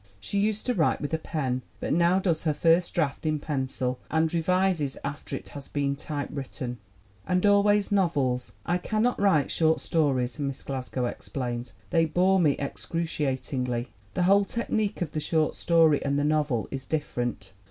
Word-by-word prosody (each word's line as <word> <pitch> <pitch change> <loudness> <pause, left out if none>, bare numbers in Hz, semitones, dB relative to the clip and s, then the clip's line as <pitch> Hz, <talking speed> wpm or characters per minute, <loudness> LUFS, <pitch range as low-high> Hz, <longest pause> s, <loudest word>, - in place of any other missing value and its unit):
She 200 - -2
used 215 +1 0
to 250 - +1
write 165 -8 +2
with 145 +1 -4
a 160 - +1
pen, 130 -6 -2 0.2
but - - -1
now 170 +3 +4
does 175 -5 +1
her 155 -3 0
first 170 +2 +3
draft 150 -5 0
in 155 -1 +1
pencil 130 -4 -2
and 160 +1 +1
revises 175 -4 +1
after 145 +1 -4
it - - -8
has 140 -2 -9
been 140 -1 -1
typewritten. 140 -4 -5 0.5
And 180 +2 +2
always 205 0 +4
novels. 135 - +1
"I 175 +1 +1
cannot 220 +6 0
write 185 -9 +3
short 160 -1 +3
stories," 130 -6 0
Miss 140 -2 -3
Glasgow 130 -2 -3
explains. 120 -1 -4 0.2
"They 165 -1 +4
bore 185 +4 +3
me 150 -5 +4
excruciat 145 -2 -2
ingly. 125 -2 -1 0.3
The 180 - +2
whole 200 +3 +5
technique 215 -2 -1
of 155 - -6
the 155 - -2
short 155 0 +1
story 165 -3 +4
and 140 0 0
the 145 - +1
novel 150 -6 +1
is 135 -1 -5
different. 120 -10 -3
155 Hz, 170 wpm, -27 LUFS, 135-175 Hz, 0.5 s, whole